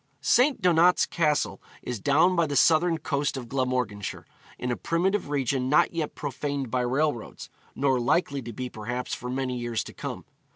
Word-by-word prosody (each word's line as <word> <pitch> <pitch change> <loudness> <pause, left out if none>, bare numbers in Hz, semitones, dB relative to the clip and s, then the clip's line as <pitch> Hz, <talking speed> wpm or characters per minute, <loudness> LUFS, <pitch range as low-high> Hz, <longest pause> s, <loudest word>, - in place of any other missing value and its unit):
St. 255 +1 +4
Donat's 180 0 +4
Castle 150 -4 0 0.2
is 125 -3 -4
down 165 - +3
on 165 -3 +2
the 145 - -2
southern 165 +3 +4
coast 145 -2 -1
of 125 -2 -6
Glamorganshire, 125 -6 -2 0.3
in 125 - -3
a - - 0
primitive 180 +3 0
region 135 -2 0
not 150 - +4
yet 160 -3 -3
profaned 140 -2 -4
by 125 - +1
railroads, 130 -1 -2 0.2
nor 135 -2 +2
likely 140 +3 +1
to 120 -1 -7
be 125 +3 -5
perhaps 120 +2 -5
for 125 - -5
many 130 0 -2
years 120 -2 -2
to - - -11
come. - - -6
140 Hz, 170 wpm, -26 LUFS, 125-160 Hz, 0.3 s, St